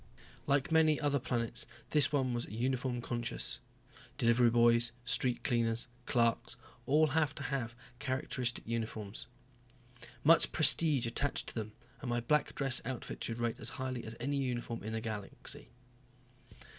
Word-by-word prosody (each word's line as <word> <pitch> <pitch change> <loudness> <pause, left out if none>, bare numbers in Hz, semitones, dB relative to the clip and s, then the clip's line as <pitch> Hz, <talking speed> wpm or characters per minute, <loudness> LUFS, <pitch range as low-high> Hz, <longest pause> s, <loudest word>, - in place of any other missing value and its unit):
Like 140 +2 +2
many 160 -2 +5
other 145 -1 +1
planets, 120 -2 -2 0.2
this 150 -2 +4
one 130 -4 +1
was 120 0 -2
uniform 125 +2 -1
conscious. 120 - -3 0.6
Delivery 120 +1 +4
boys, 120 0 +4
street 125 -2 +1
cleaners, 115 -1 +1 0.2
clerks 115 0 +1 0.3
all 150 +3 +5
had 150 0 +1
to 145 - -5
have 130 -5 -2 0.2
characteristic 130 -2 -2
uniforms. 110 -2 -4 1.0
Much 165 +3 +6
prestige 155 -4 +4
attached 130 +4 -1
to - - -7
them, 110 -2 -4 0.3
and 130 - -4
my 120 0 +1
black 150 +5 +1
dress 135 -3 +2
outfit 130 +1 -5
should 115 - -2
rate 120 -1 -1
as 110 - -2
high 130 -1 -2
as 110 +1 -7
any 140 +4 -1
uniform 120 -3 -2
in 110 - -5
the 110 - -2
galaxy. 105 -3 -6
120 Hz, 145 wpm, -33 LUFS, 115-140 Hz, 1.0 s, Much